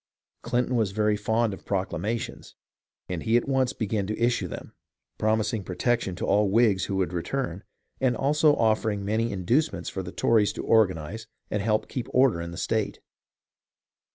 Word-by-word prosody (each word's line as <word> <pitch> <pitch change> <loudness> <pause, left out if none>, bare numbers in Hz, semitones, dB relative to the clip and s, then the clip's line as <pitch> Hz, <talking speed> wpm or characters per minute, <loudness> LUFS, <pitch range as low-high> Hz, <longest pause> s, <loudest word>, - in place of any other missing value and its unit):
Clinton 125 +1 0
was 110 -5 +1
very 105 0 +2
fond 110 +1 0
of 95 - -10
proclamations, 100 +3 -3 0.5
and 90 -3 -3
he 115 +1 +3
at 120 - -1
once 135 -2 +2
began 105 -5 -2
to 110 - -3
issue 120 +1 +1
them, - - -8 0.5
promising 110 -1 +1
protection 95 +1 -1
to - - -3
all 105 +1 +3
Whigs 105 -3 +3
who 100 - -3
would 95 -2 0
return, 95 +1 -3 0.4
and 130 -2 +1
also 150 +2 +3
offering 110 -3 +1
many 110 +3 0
inducements 120 - 0
for 95 - -4
the 90 -1 -7
Tories 110 -1 +2
to - - -5
organize 105 0 +1 0.2
and 105 - 0
help 110 +1 +1
keep 125 - -4
order 125 -9 +4
in 85 - -5
the 85 - -8
state. 110 +2 -1
110 Hz, 165 wpm, -26 LUFS, 95-120 Hz, 0.5 s, order